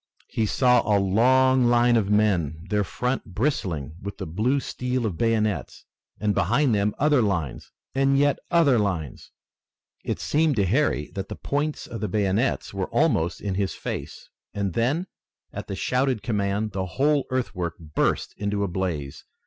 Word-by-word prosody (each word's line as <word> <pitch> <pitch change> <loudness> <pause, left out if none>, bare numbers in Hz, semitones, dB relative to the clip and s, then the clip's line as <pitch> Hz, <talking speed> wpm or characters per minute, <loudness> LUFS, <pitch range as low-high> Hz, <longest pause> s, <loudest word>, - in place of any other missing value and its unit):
He 110 - 0
saw 125 +2 +4
a 105 -2 +2
long 125 +6 +4
line 120 0 +4
of 105 -4 +1
men, 90 -7 +1
their 105 -1 +2
front 125 +6 -2
bristling 90 - -1
with 100 +1 -6
the - - -5
blue 110 - 0
steel 125 -2 -2
of 100 -6 -2
bayonets, 110 - -1 0.3
and 105 -1 +1
behind 120 - +2
them 105 0 +1
other 145 -2 +3
lines 90 - -2 0.2
and 135 +1 +2
yet 145 0 +2
other 160 -8 +4
lines. 90 - -3 0.7
It - - -3
seemed 155 -1 +1
to 100 -3 +2
Harry 105 - +1
that 95 -1 -5
the - - -5
points 145 +2 -2
of 115 - -7
the 105 - -1
bayonets 105 +4 0
were 95 -2 -3
almost 115 - +1
in 100 -2 -2
his 95 0 -1
face, - - -6 0.3
and 100 -3 -1
then, 135 - 0 0.5
at - - -6
the 100 - -4
shouted 125 +3 0
command, 105 -1 -1
the 95 -1 -3
whole 145 0 +2
earthwork 90 -10 -2
burst 80 -3 -1
into 100 0 -1
a - - 0
blaze. 85 -7 -4
105 Hz, 165 wpm, -25 LUFS, 95-130 Hz, 0.7 s, saw